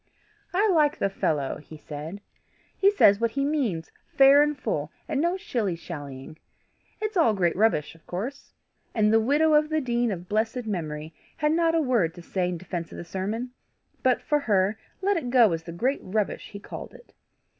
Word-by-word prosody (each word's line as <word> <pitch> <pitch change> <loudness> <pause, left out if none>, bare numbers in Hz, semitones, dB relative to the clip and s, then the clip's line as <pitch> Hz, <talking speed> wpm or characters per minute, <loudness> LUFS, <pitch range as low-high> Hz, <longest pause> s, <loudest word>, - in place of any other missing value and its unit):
"I 400 +4 +3
like 310 -4 +3
the 195 - 0
fellow," 145 -7 -1
he 155 +1 -12
said. 155 +6 -7 0.5
"He 395 - +5
says 205 - +5
what 230 0 +2
he 275 +4 -1
means, 250 - -1 0.3
fair 275 +1 +8
and 295 0 +1
full, - - -2 0.2
and 290 -3 0
no 345 +3 +1
shilly 215 - -2
shallying. 145 -3 -8 0.6
It's 430 0 -3
all 275 - +4
great 175 -3 +1
rubbish, 190 -8 +2
of 165 -1 -22
course!" 235 +11 -5 0.4
And 215 -1 +3
the 225 - +6
widow 295 +7 +3
of 300 0 +4
the 315 0 +1
dean 240 -3 0
of 180 -2 -6
blessed 225 +4 -1
memory 155 -6 -4 0.2
had 300 +1 +1
not 330 0 +2
a 325 - +3
word 225 - +1
to 175 - -11
say 180 0 -1
in 180 - -3
defence 170 -1 -5
of - - -9
the - - -6
sermon, 210 +8 -3 0.5
but, 255 -1 +2
for 295 - +2
her, 205 -5 +1 0.2
let 400 0 +2
it 265 -7 -3
go 240 -5 +5
as 165 -1 -2
the 170 - -6
great 250 +12 0
rubbish 205 +2 -2
he 200 - -8
called - - -9
it. - - -17
220 Hz, 195 wpm, -26 LUFS, 175-285 Hz, 0.6 s, fair